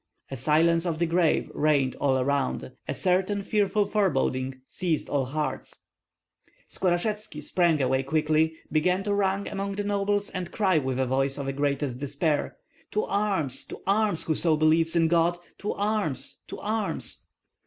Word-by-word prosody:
A - - -3
silence 165 +6 +2
of 165 -2 -1
the 170 - +1
grave 170 -1 +1
reigned 145 -4 +2
all 135 -2 +2
around. 135 0 -1 0.2
A - - -1
certain 190 +2 +1
fearful 205 0 +1
foreboding 135 -10 0
seized 170 -4 -2
all 140 -2 +1
hearts. 135 0 -4 0.9
Skorashevski 195 0 -1
sprang 170 -3 +2
away 130 0 +2
quickly, 155 +3 +1 0.2
began 180 +5 +2
to 205 0 0
run 200 0 +1
among 200 0 -3
the 205 +1 -3
nobles 205 0 0
and 185 -2 -5
cry 190 -6 +2
with 130 -2 -2
a 130 - +1
voice 135 +2 0
of 140 - -4
the 135 - -2
greatest 140 -2 -1
despair: 145 +2 -1 0.4
"To 215 - +1
arms, 190 -10 0
to - - -9
arms, 205 -3 +2
whoso 160 0 +2
believes 160 +2 +3
in 165 -1 +4
God! 170 +1 +2 0.2
To 205 - -2
arms, 205 -8 -1
to - - -7
arms!" 215 +1 -2
165 Hz, 155 wpm, -26 LUFS, 140-195 Hz, 0.9 s, in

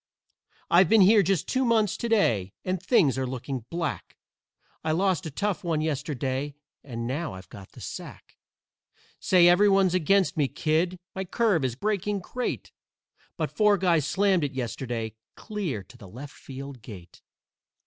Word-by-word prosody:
"I've 175 0 +6
been 225 -2 +6
here 205 +3 +7
just 190 -3 0
two 260 0 +1
months 225 -4 +2
to 235 - -3
day, 110 - +2
and 185 -1 -1
things 170 - +3
are 130 - -1
looking 130 -1 -5
black; 170 -3 -4 0.7
I 155 - 0
lost 185 0 +1
a - - -4
tough 200 +6 -2
one 165 -3 0
yesterday, 145 -2 -2 0.3
and 115 -4 -5
now 145 - -3
I've 95 0 -12
got 95 -2 -12
the - - -13
sack. - - -9 0.8
Say, 180 -2 +5
everyone's 195 0 +5
against 185 +1 +2
me, 145 -3 +2
kid. 165 +6 0 0.2
My 190 - -3
curve 195 - +1
is 125 -3 -1
breaking 205 - -1
great, 250 +6 -4 0.7
But - - -2
four 210 -1 +4
guys 170 -6 +2
slammed 195 -4 +2
it 145 -1 -2
yesterday 120 -3 -4 0.2
clear 190 - -4
to - - -17
the 100 - -12
left 135 +8 -9
field 135 -1 -9
gate. 95 -6 -12
165 Hz, 160 wpm, -26 LUFS, 130-195 Hz, 0.8 s, here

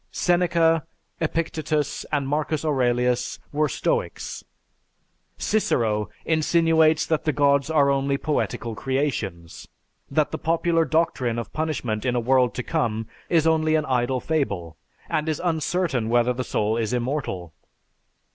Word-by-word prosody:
Seneca, 170 -2 +2 0.4
Epictetus, 155 -2 -1
and 145 -3 0
Marcus 150 +2 -1
Aurelius 125 -4 +1
were 150 +1 +1
stoics. - - -2 0.9
Cicero 110 - 0 0.2
insinuates 160 0 +3
that 160 -2 0
the 155 - +1
gods 140 -1 +2
are 145 -3 +4
only 140 0 +1
poetical 140 -6 -2
creations, 110 - -3 0.4
that 150 +2 +1
the - - -4
popular 165 0 +1
doctrine 140 -8 0
of 115 -2 -5
punishment 135 -9 -2
in 125 -1 0
a - - +2
world 125 +1 +2
to 125 - -3
come 115 -9 -1 0.2
is 165 -2 +3
only 160 -1 +3
an 155 -1 +1
idle 130 -1 0
fable, 100 - -2 0.3
and 155 +1 -1
is 155 - -1
uncertain 160 -7 0
whether 120 +1 +3
the 130 +1 -3
soul 110 -2 0
is 115 0 -1
immortal. 120 - -3
145 Hz, 130 wpm, -24 LUFS, 120-160 Hz, 0.9 s, are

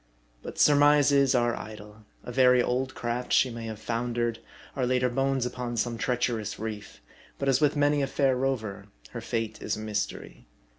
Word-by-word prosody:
But - - -8
surmises 145 -2 +5
are 120 -1 +2
idle. 105 0 -10 0.2
A - - -7
very 125 0 +5
old 130 +2 -1
craft, 120 +1 -3
she 130 - +4
may 115 -1 -6
have 110 -1 -6
foundered; 120 0 -2 0.4
or 130 -3 0
laid 125 0 +1
her 125 - +3
bones 135 0 0
upon 125 -1 -4
some 115 0 -1
treacherous 120 -4 -1
reef; 110 - -7 0.4
but 140 - -3
as 135 0 +3
with 150 -1 +3
many 145 0 +2
a 135 - 0
far 135 -1 +1
rover, 125 -6 -3 0.2
her - - -6
fate 115 -1 -3
is 105 - -2
a - - -8
mystery. 105 - -5
125 Hz, 180 wpm, -27 LUFS, 115-135 Hz, 0.4 s, surmises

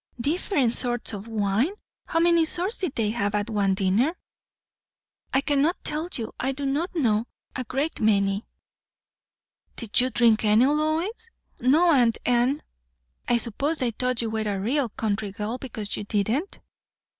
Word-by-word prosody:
"Different 285 - +1
sorts 240 -2 0
o' 205 - -4
wine! 220 - 0 0.3
How 330 - -1
many 340 0 +4
sorts 360 +7 -1
did 360 -8 -2
they 215 -2 +1
have, 205 -3 -1
at 210 +2 -1
one 200 -2 +1
dinner?" 210 - +1 1.1
"I 270 - +3
cannot 290 +5 +1
tell 310 +3 0
you. 225 -2 -5
I 265 +2 0
do 280 +1 -4
not 305 +7 -1
know. 230 -7 +1 0.3
A 255 - -2
great 280 +7 -2
many." 200 -1 +2 1.3
"Did 230 0 +1
you 255 - +1
drink 230 -3 +3
any, 215 +3 +5
Lois?" 315 - 0 0.3
"No, 310 +8 +4
aunt 240 -5 +3
Anne." 245 +4 +2 0.6
"I 240 - +3
suppose 275 +7 -1
they 250 -4 0
thought 250 +1 -1
you 225 - -2
were 220 - -1
a 195 - -2
real 250 +5 0
country 210 -1 -2
girl, 215 +5 -4
because 220 -6 -4
you - - -4
didn't?" 220 - -1
245 Hz, 155 wpm, -25 LUFS, 215-300 Hz, 1.3 s, any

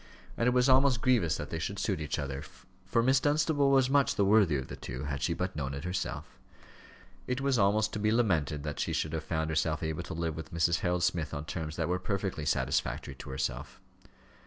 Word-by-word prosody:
And 115 - +1
it - - +5
was 125 +1 +3
almost 130 -2 +4
grievous 115 -11 +3
that 75 - -6
they 80 - -2
should 100 +5 -3
suit 95 -4 -1
each 75 - -2
other, 70 0 -4 0.4
for 115 +4 +2
Miss 130 +2 +4
Dunstable 145 0 +2
was 135 -2 +4
much 140 0 +3
the 100 - +2
worthier 100 -7 +4
of 65 - -9
the - - -7
two, 65 +2 -6
had 70 -2 -3
she 85 +5 0
but 90 +2 -3
known 70 -2 -3
it 70 - -6
herself. 90 +1 -4 0.9
It 125 0 -1
was 135 -3 +1
almost 105 +2 +2
to 105 - -2
be 105 +1 +2
lamented 80 -11 +1
that 75 -1 -4
she - - -1
should 80 - -1
have 80 -1 -2
found 80 -1 -2
herself 80 0 0
able 80 +1 -2
to 90 0 -7
live 80 -1 -2
with 80 - -8
Mrs. 85 0 +2
Harold 90 -2 0
Smith 85 -4 0
on 75 +1 -5
terms 80 -1 -4
that 80 -2 -1
were 90 +1 0
perfectly 95 -5 -3
satisfactory 70 - -1
to 65 - -11
herself. 65 0 -4
90 Hz, 225 wpm, -30 LUFS, 75-115 Hz, 0.9 s, it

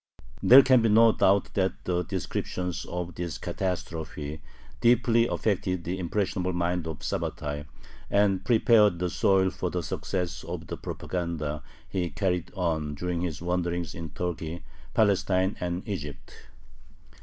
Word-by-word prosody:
There 135 +2 +9
can 130 -2 +5
be 115 - +3
no 115 +2 +7
doubt 100 -1 +2
that 95 -1 +1
the 90 -1 +1
descriptions 90 +1 -3
of 90 0 -4
this 85 -5 -4
catastrophe 80 -5 -4 0.4
deeply 120 0 +4
affected 95 -6 -1
the 90 +3 -3
impressionable 95 0 -1
mind 85 -1 -1
of 75 -3 -6
Sabbatai, 75 0 -3 0.4
and 100 -2 +2
prepared 110 -4 +4
the 90 0 -1
soil 95 -1 +3
for 90 - -3
the 90 0 -2
success 90 +2 -3
of - - -6
the - - -6
propaganda 80 -4 -4 0.3
he 90 -3 -2
carried 90 -4 -1
on 80 -5 -1
during 90 +2 -2
his 85 -3 -3
wanderings 85 -1 -1
in 80 -2 -6
Turkey, 85 0 -4 0.3
Palestine, 95 -2 +2
and 90 +1 -3
Egypt. 75 -8 -7
90 Hz, 135 wpm, -27 LUFS, 85-95 Hz, 0.4 s, There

